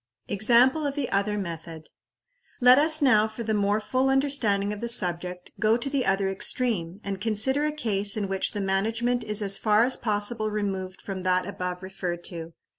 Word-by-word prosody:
Example 245 +8 +3
of 280 - -4
the 280 -4 -3
other 200 +1 0
Method. 165 -4 -7 0.7
Let 250 +2 +6
us 310 0 +5
now, 220 -5 +4
for 220 +2 -7
the 220 -1 -2
more 205 0 +1
full 260 +4 -1
understanding 250 -8 +1
of 210 - -8
the 235 - -1
subject, 180 -4 0
go 220 +1 +3
to 245 +3 -4
the 275 -3 -1
other 195 0 +1
extreme, 195 -2 -1
and 195 -1 -5
consider 230 +7 +2
a 300 - 0
case 205 -8 -1
in 205 -2 -2
which 190 0 -2
the 205 - -3
management 225 +5 -1
is 210 -1 -1
as 195 -1 +1
far 215 0 +3
as 255 +2 +2
possible 215 0 -1
removed 195 -3 -4
from 195 -2 -6
that 185 0 +1
above 180 -1 -5
referred 180 -2 -5
to. 165 -2 -7
210 Hz, 190 wpm, -25 LUFS, 190-240 Hz, 0.7 s, Let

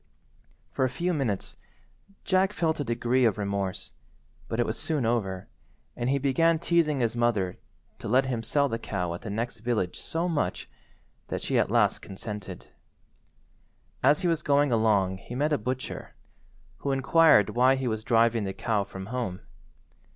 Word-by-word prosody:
For - - -1
a 130 - +2
few 175 +8 -1
minutes 125 - -2 0.7
Jack 190 +1 +2
felt 160 -3 0
a - - 0
degree 120 +1 +1
of 110 -4 +3
remorse, 100 -1 -3 0.5
but - - -3
it - - +3
was - - -2
soon 150 -6 -1
over, 100 -6 -1 0.5
and 120 +1 -2
he 140 - +2
began 150 +5 +3
teasing 160 -4 +1
his 115 -1 0
mother 110 -6 0 0.4
to - - -6
let 130 +5 +3
him 125 -3 -2
sell 140 +5 +2
the 115 -3 -3
cow 90 -4 -3
at 85 - -7
the 110 - -6
next 115 +3 -3
village 110 -6 -1
so 165 +2 -2
much, 160 -4 -2 0.6
that - - -4
she - - +1
at - - +1
last - - +3
consented. 95 -1 -8 1.4
As 145 +6 +4
he - - +2
was 165 -2 +1
going 145 -2 +3
along 105 -5 +2
he 120 - -9
met 150 +4 +1
a - - +1
butcher, 130 +4 -5 0.6
who 140 - -2
inquired 135 - +5
why 130 +2 +4
he 130 -1 -2
was 110 -2 -2
driving 115 -1 +3
the 95 -1 -3
cow 105 -1 0
from 95 -1 -8
home. 115 -5 -4
120 Hz, 170 wpm, -27 LUFS, 105-140 Hz, 1.4 s, inquired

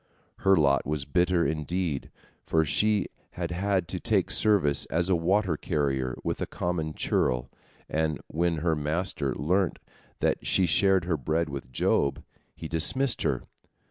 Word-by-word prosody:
Her 95 0 +4
lot 70 -4 +3
was 75 -2 -2
bitter, 90 +2 +2
indeed, 80 -1 -2 0.3
for 80 -1 +1
she 105 +5 +2 0.3
had 85 -1 -4
had 95 0 0
to - - -3
take - - +1
service 95 -10 +3
as 85 +3 0
a 95 - +4
water 90 +1 +1
carrier 70 -6 -1
with - - -3
a - - -1
common 80 -3 -3
churl, 60 -1 0 0.4
and 80 -1 -1
when 85 +1 0
her 80 -2 +2
master 75 -1 -1
learnt 90 +5 0 0.4
that - - 0
she 95 - +3
shared 95 +2 +3
her 85 -3 0
bread 80 +4 -1
with 70 -2 -7
Job, 70 +3 +1 0.3
he 80 - -7
dismissed 115 - +2
her. - - 0
85 Hz, 150 wpm, -27 LUFS, 75-90 Hz, 0.4 s, Her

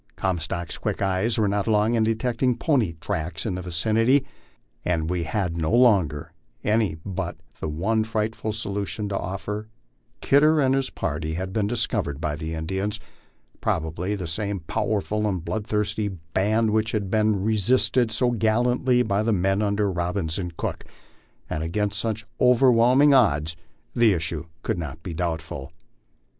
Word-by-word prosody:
Comstock's 85 -2 -2
quick - - -2
eyes 95 +4 +1
were 110 -2 +2
not 100 +1 0
long 110 +1 +3
in 115 - +2
detecting 115 +2 +1
pony 125 - +1
tracks 80 0 -4
in 105 - -1
the 90 - -4
vicinity, 110 +10 +2 0.6
and 85 -1 0
we 90 -2 -1
had 90 0 -1
no 80 -1 -1
longer 95 - +3 0.3
any 105 -5 +1
but 95 -3 -4 0.2
the 80 - -3
one 105 +9 0
frightful 110 0 -2
solution 100 -3 -3
to 100 - -2
offer: 105 +3 -4 0.5
Kidder 150 +3 +4
and 135 -2 +3
his 135 -1 0
party 80 +1 -3
had 95 +2 -4
been 105 -1 +1
discovered 105 - -1
by 75 -2 -2
the 80 +2 -4
Indians, 95 +6 -2 0.6
probably 80 +5 -1
the 95 -3 -5
same 100 +3 -2
powerful 105 +3 -1
and 90 -4 -2
bloodthirsty 105 0 -1
band 100 +5 0
which 110 +1 +1
had 100 -3 -2
been 110 -3 +2
resisted 110 +3 +2
so 120 +2 +1
gallantly 120 +2 +2
by 100 -2 0
the 115 +1 +1
men 95 0 +1
under 100 -1 +1
Rob 90 0 -2
bins 80 -3 -1
and 90 -3 -5
Cook; - - -3 0.6
and 75 - -3
against 105 +5 -1
such 110 -2 -2
overwhelming 125 +2 +5
odds 80 - +3 0.4
the 120 -4 +5
issue 80 -1 -3 0.2
could 110 -6 -1
not 80 0 -6
be 85 - -5
doubtful. 80 -4 -4
100 Hz, 155 wpm, -24 LUFS, 85-110 Hz, 0.6 s, overwhelming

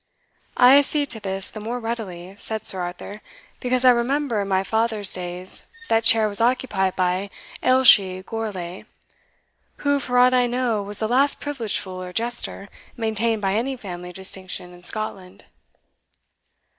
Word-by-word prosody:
"I 255 +3 +8
accede 285 0 0
to 225 - -2
this 195 -1 -4
the 215 - -8
more 230 +4 -4
readily," 200 -6 -6
said 220 0 -5
Sir 190 - +2
Arthur, 180 +4 -7 0.4
"because 255 0 0
I 255 - +9
remember 245 -1 0
in 200 - -3
my 190 -1 +1
fathers 220 -1 0
days 180 0 -5 0.3
that 225 0 +3
chair 225 -1 +6
was 205 +1 +2
occupied 230 -6 +1
by 185 +2 0 0.3
Ailshie 205 -8 +5
Gourlay, 195 -6 -5 1.0
who, 285 0 +3
for 250 -2 -2
aught 250 +1 +6
I 250 -1 +3
know, 240 -3 0
was 205 0 -6
the 220 - -1
last 270 +5 +3
privileged 260 -8 -2
fool, 185 -2 -6
or 180 0 -8
jester, 230 -2 -2 0.3
maintained 225 -1 -1
by 195 0 +1
any 255 +5 -1
family 180 -5 -8
of 180 - -13
distinction 185 -1 -5
in 175 - -15
Scotland." 190 -2 -5
215 Hz, 155 wpm, -22 LUFS, 190-245 Hz, 1.0 s, I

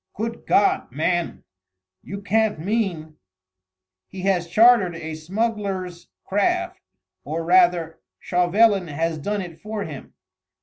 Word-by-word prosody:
"Good 230 +2 -5
God, 200 - +2
man... 170 +5 -1 0.6
you 200 +1 -8
can't 220 0 +1
mean 170 -4 -2 0.4
...?" 95 0 -65
"He 190 - -8
has 180 -3 +1
chartered 215 -2 +5
a 160 -1 -6
smuggler's 190 0 -3 0.2
craft 355 - 0 0.4
or 165 +2 -4
rather 175 -2 +3 0.2
Chauvelin 190 +2 +2
has 160 +1 -2
done 205 +5 -2
it 165 -2 -11
for 215 -1 -4
him. 150 -6 -9
180 Hz, 120 wpm, -23 LUFS, 160-210 Hz, 0.6 s, chartered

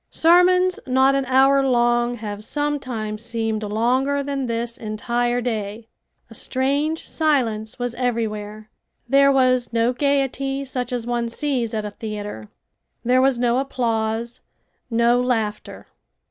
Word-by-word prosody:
Sermons 360 +3 +4
not 265 +1 +4
an 275 -1 0
hour 270 +2 +4
long 240 -1 +2
have 210 -2 -6
sometimes 250 -6 -3
seemed 225 -2 -2
longer 250 +7 0
than 275 -2 -3
this 235 0 -2
entire 240 +2 -1
day. 220 -2 -4 0.4
A - - -14
strange 285 +5 -1
silence 235 -9 0
was 245 -2 -3
everywhere. 215 -3 -3 0.4
There 275 +2 +5
was 255 -3 +2
no 230 +1 +1
gaiety 275 0 0
such 250 -2 -4
as 245 -2 -3
one 240 -1 -1
sees 240 -3 -2
at 215 -1 -2
a 210 - -5
theater. 205 - -7 0.6
There 255 +2 +4
was 265 -1 +3
no 240 +1 +2
applause, 235 -3 -2 0.5
no 235 +1 +3
laughter. 225 -4 -2
245 Hz, 130 wpm, -22 LUFS, 225-270 Hz, 0.6 s, There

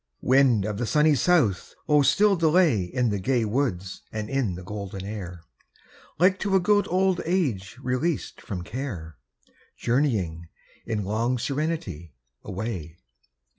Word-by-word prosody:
Wind 130 -6 +4
of 105 -1 -3
the 120 - -1
sunny 150 +3 +4
south! 135 - +2
oh 150 -1 +5
still 195 +10 +4
delay 160 - +3
In 120 +7 0
the 100 - -1
gay 120 +3 +1
woods 105 -6 -2
and 105 0 -5
in 130 -10 0
the 90 - -8
golden 100 0 -6
air, 90 -5 -7 0.7
Like 185 +2 +4
to 200 -2 0
a - - +6
good 205 +3 +2
old 185 0 +1
age 130 - -1
released 130 +5 -2
from 90 -3 -5
care, 90 - -6 0.6
Journeying, 105 - 0 0.4
in 105 -3 -2
long 115 +5 0
serenity, 120 - -3 0.3
away. 95 -5 -5
120 Hz, 135 wpm, -25 LUFS, 95-150 Hz, 0.7 s, a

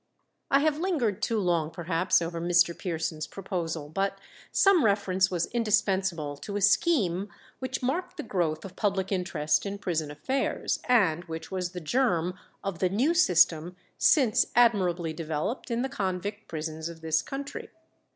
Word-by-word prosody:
I 275 - +4
have 305 0 +1
lingered 295 - 0
too 230 - 0
long 170 -5 +1
perhaps 170 +1 +1
over 165 0 -4
Mr. 175 0 +3
Pearson's 160 -3 -3
proposal, 170 -6 -4
but 195 +5 -1 0.3
some 390 -5 +5
reference 190 -3 +2
was 175 -2 0
indispensable 190 -9 +1
to 200 +7 -7
a - - -3
scheme 200 - +2 0.3
which 260 0 -4
marked 355 +8 -2
the 305 - -4
growth 165 - -1
of 185 -1 -9
public 195 -2 -1
interest 170 -5 0
in 200 0 -4
prison 165 -6 -2
affairs, 260 - -1
and 180 -9 +3
which 160 -1 -7
was 180 -1 -3
the 180 - -4
germ 180 - +1 0.3
of 195 -4 -4
the 185 - +2
new 250 - +2
system 175 - +3 0.2
since 255 -8 +4
admirably 185 -8 +3
developed 160 - -3
in 235 +1 0
the - - 0
convict 205 -4 -3
prisons 160 0 -4
of 165 -1 -11
this 160 0 +1
country. 280 +1 -6
185 Hz, 155 wpm, -28 LUFS, 165-225 Hz, 0.3 s, some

